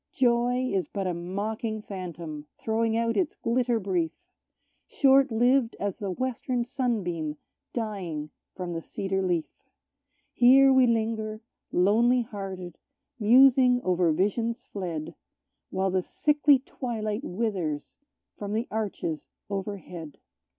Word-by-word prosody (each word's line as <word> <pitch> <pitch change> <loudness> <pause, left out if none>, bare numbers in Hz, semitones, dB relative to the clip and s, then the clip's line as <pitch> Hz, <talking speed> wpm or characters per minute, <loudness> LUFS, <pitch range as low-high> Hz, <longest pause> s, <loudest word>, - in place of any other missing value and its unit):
Joy 245 0 +2
is 190 -2 0
but 195 -2 -4
a 180 - 0
mocking 210 +5 -3
phantom, 170 -6 -7
throwing 225 0 0
out 230 0 +1
its 350 -5 0
glitter 240 0 +1
brief 180 -5 0 0.8
Short 270 -1 +4
lived 245 +1 +3
as 200 -2 -3
the 200 - -3
western 250 +4 -2
sunbeam 185 - -2 0.3
dying 185 -10 -4 0.2
from 180 -2 -4
the 165 - -3
cedar 190 +3 -2
leaf. 175 -4 0 0.9
Here 270 +2 +7
we 260 -1 +5
linger, 220 -1 -1 0.3
lonely 235 +7 +3
hearted, 190 -6 -7 0.4
musing 250 +2 +6
over 180 -2 +2
visions 210 +7 0
fled, 170 -6 -5 0.6
While 190 0 0
the 185 0 +1
sickly 295 +6 +3
twilight 230 -3 -4
withers 180 - -3 0.4
from 205 0 -4
the 225 +3 -1
arches 195 -8 -3 0.2
overhead. 190 -6 -5
215 Hz, 115 wpm, -27 LUFS, 180-240 Hz, 0.9 s, Here